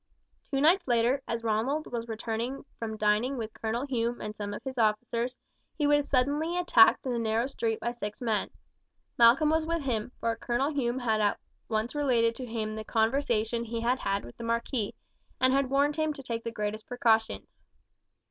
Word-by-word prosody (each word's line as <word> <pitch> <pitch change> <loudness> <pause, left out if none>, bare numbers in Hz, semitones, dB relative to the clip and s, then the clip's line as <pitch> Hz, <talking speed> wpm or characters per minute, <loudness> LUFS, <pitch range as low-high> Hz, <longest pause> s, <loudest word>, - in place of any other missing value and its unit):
Two 275 - 0
nights 345 +4 +4
later, 240 +3 +2
as 230 0 -3
Ronald 230 +8 0
was 235 -1 -3
returning 230 +4 -4
from 220 -1 -4
dining 215 +6 +1
with 220 -2 -5
Colonel 230 +4 -2
Hume 240 -3 -1
and 210 0 -5
some 205 -1 -5
of 205 - -7
his 260 -2 -5
officers, 235 +3 0 0.4
he 300 - +1
was 290 0 +3
suddenly 290 +6 +1
attacked 275 -12 +5
in 255 - -1
a 235 - -1
narrow 225 +1 +1
street 230 -5 -2
by 235 - -2
six 210 -3 -6
men. 225 -4 0 0.7
Malcolm 250 +7 +6
was 320 0 +2
with 335 -1 -2
him, 235 -3 -2
for 230 0 0
Colonel 245 +5 -1
Hume 250 -3 0
had 220 -4 +1
at 205 -1 +1 0.3
once 220 +2 -1
related 245 -6 +2
to 255 - -6
him 220 -2 -3
the 220 0 -5
conversation 230 0 +1
he 230 0 -4
had 245 +2 +1
had 195 0 -1
with 120 - -11
the - - -7
marquis, 230 -1 -1 0.4
and 260 0 +4
had 275 -1 +2
warned 285 +2 +2
him 310 -1 +1
to 275 - -10
take 230 -2 -4
the - - -3
greatest 215 -1 -4
precautions. 225 -3 +1
235 Hz, 190 wpm, -29 LUFS, 220-270 Hz, 0.7 s, Malcolm